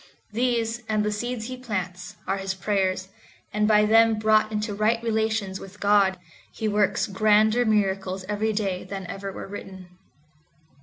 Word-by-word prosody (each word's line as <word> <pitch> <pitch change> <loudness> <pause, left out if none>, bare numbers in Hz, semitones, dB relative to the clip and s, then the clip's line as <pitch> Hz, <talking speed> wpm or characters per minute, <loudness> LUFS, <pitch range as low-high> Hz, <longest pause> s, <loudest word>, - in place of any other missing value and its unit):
These, 235 0 0
and 215 -1 +1
the 210 - 0
seeds 235 +2 -3
he 255 +2 -5
plants, 185 -7 -5
are 195 - -1
his 195 0 -3
prayers, 190 -1 -1 0.4
and 210 0 +2
by 210 -1 +5
them 225 +1 +5
brought 215 0 +3
into 210 0 -2
right 215 +3 +2
relations 220 -4 -1
with 195 +1 -12
God, 200 -2 +3 0.3
he 220 - -3
works 210 -1 +2
grander 215 +3 +3
miracles 195 -3 0
every 210 +1 0
day 195 -4 -2
than 190 0 -6
ever 195 +2 -6
were - - -7
written. 190 -2 -9
210 Hz, 155 wpm, -25 LUFS, 195-220 Hz, 0.4 s, by